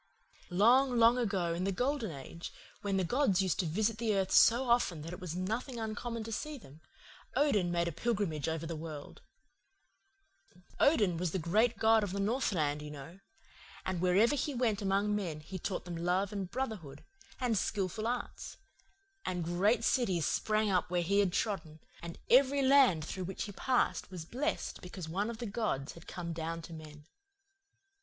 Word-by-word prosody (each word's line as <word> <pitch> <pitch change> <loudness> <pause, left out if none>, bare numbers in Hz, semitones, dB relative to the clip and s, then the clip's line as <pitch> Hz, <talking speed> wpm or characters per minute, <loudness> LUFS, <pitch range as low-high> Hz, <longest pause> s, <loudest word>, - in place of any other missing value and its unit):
"Long, 240 +7 +4
long 235 +2 +6
ago, 195 -7 0
in 170 +2 -2
the 195 - 0
Golden 250 +2 -1
Age, 160 +3 -8 0.3
when 200 -1 0
the 190 - +1
gods 205 -1 +2
used 185 - 0
to 180 - +1
visit 215 +6 0
the 225 -3 +1
earth 190 -1 0
so 245 +3 +5
often 210 -10 +2
that 165 +2 -6
it - - -7
was 175 -2 -5
nothing 225 +7 -3
uncommon 225 +1 -4
to 225 - -7
see 300 +7 -4
them, 155 - -15 0.5
Odin 210 -12 +2
made 170 0 +1
a - - -1
pilgrimage 170 -5 -1
over 160 0 -3
the 165 0 -4
world. 155 -2 -8 1.6
Odin 210 - +4
was 170 -1 -2
the - - +1
great 215 +8 +2
god 220 0 +4
of 195 -3 -3
the 200 - -2
northland, 190 - 0
you 150 - -7
know. 150 +5 -10 0.7
And 185 -2 -2
wherever 195 +8 +4
he 290 0 -2
went 225 -4 +1
among 200 +1 +1
men 175 -7 -3
he 185 +5 -7
taught 185 +1 -3
them 175 -1 -5
love 180 +4 0
and 195 -3 -3
brotherhood, 195 - -5 0.4
and 245 -4 +1
skilful 205 +2 -1
arts; 245 0 -4 0.7
and 180 -2 -2
great 190 +8 +2
cities 190 - +1
sprang 215 -1 +1
up 180 -1 +1
where 175 -1 +1
he 200 +4 +2
had 195 -3 +3
trodden, 165 -7 -2 0.2
and 170 0 -7
every 275 +2 +5
land 260 - +5
through 185 +2 -4
which 190 - -4
he 205 - -6
passed 250 +5 0
was 180 -4 -7
blessed 280 - -3
because 180 -2 -7
one 195 +7 -1
of 235 - -5
the 240 - -5
gods 200 - -2
had 170 - -14
come 170 -2 -5
down 165 +1 -4
to 165 - -9
men. 150 -2 -11
195 Hz, 180 wpm, -32 LUFS, 170-230 Hz, 1.6 s, long